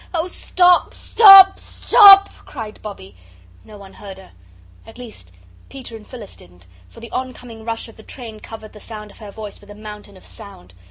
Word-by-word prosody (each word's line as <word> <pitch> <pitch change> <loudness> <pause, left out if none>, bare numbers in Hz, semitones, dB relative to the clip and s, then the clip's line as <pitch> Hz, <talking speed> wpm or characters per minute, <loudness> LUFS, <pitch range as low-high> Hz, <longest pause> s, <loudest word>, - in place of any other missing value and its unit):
"Oh, 330 +1 -3
stop, 360 0 0
stop, 390 -3 +6
stop!" 400 -3 +4 0.2
cried 220 -6 -11
Bobbie. 150 - -12 0.5
No 215 - -16
one 195 -1 -16
heard 195 -2 -13
her. 190 -1 -18 0.5
At 225 - -18
least 220 - -13 0.4
Peter 260 -4 -12
and 215 -1 -15
Phyllis 235 -6 -13
didn't, 90 0 -20 0.2
for - - -18
the 235 - -13
oncoming 250 -3 -9
rush 230 +1 -7
of 225 - -19
the - - -16
train 225 -2 -12
covered 220 0 -13
the 210 - -15
sound 210 -1 -12
of - - -22
her 210 -2 -12
voice 210 0 -12
with 205 - -21
a 205 - -13
mountain 210 -2 -13
of - - -21
sound. 145 - -16
220 Hz, 185 wpm, -17 LUFS, 205-250 Hz, 0.5 s, stop